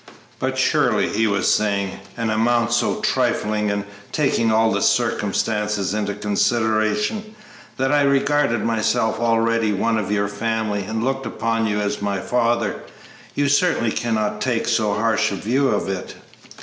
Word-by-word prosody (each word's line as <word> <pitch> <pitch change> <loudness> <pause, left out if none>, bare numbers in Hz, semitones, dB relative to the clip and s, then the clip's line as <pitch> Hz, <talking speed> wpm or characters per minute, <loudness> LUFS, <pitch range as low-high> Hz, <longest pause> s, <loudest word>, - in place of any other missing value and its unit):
"But - - -2
surely," - - +2
he 110 +2 +1
was 100 -1 +2
saying, 100 -2 -1 0.2
"an 115 -2 -1
amount 115 +1 +1
so 165 - 0
trifling, 115 - 0
and 100 0 -1 0.3
taking 125 -6 +1
all 110 0 +3
the - - 0
circumstances 105 -2 0
into 105 -1 -2
consideration, 110 - 0 0.4
that 135 +1 0
I 145 0 +3
regarded 140 -3 +2
myself 110 0 0
already 115 -1 +1
one 110 +3 0
of 100 -1 -3
your 100 -1 +1
family 110 0 -2
and 110 +2 -3
looked 135 +1 -2
upon 115 0 -1
you 105 -1 -1
as 105 0 -2
my 100 -1 -1
father, 120 +2 0 0.5
you 145 0 +1
certainly 145 -5 +2
cannot 110 -3 -1
take 120 -3 0
so 105 -2 +1
harsh 110 0 +1
a - - -2
view 130 +8 0
of 105 -5 0
it!" 95 -2 -5
110 Hz, 150 wpm, -21 LUFS, 105-120 Hz, 0.5 s, all